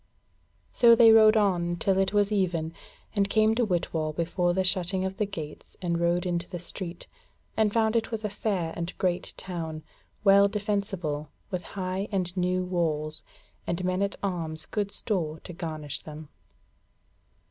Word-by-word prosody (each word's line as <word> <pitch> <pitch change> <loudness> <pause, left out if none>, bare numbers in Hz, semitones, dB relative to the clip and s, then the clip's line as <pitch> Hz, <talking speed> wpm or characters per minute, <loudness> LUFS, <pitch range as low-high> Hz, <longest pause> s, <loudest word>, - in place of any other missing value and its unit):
So 235 -1 +7
they 230 -1 +8
rode 220 0 +7
on 175 -4 +2
till 190 +3 +1
it 195 - +2
was 205 0 +2
even, 170 -5 0 0.4
and 200 -1 +2
came 215 +1 +4
to 240 +2 +1
Whitwall 165 -5 -1
before 175 +2 0
the 190 +2 +1
shutting 185 0 +1
of 190 0 -4
the 210 -2 0
gates 155 -6 -8
and 170 -2 -1
rode 170 +1 +1
into 175 -1 -2
the 180 - -4
street, 175 0 -6 0.5
and 215 -2 +3
found 220 0 +2
it 225 0 0
a 220 -1 -2
fair 195 -5 -2
and 170 +1 -5
great 180 -2 -1
town, 160 -4 -5 0.4
well 200 0 +7
defensible, 200 -8 -2 0.2
with 180 -2 -2 0.2
high 190 +1 -2
and 185 -2 -1
new 180 0 +1
walls, 155 -4 -1 0.5
and 175 +1 -1
men 185 +1 0
at 200 0 0
arms 160 -5 -2
good 205 -2 -2
store 175 -7 -2
to 175 - -9
garnish 155 -4 -5
them. 155 -1 -10
185 Hz, 160 wpm, -27 LUFS, 170-200 Hz, 0.5 s, they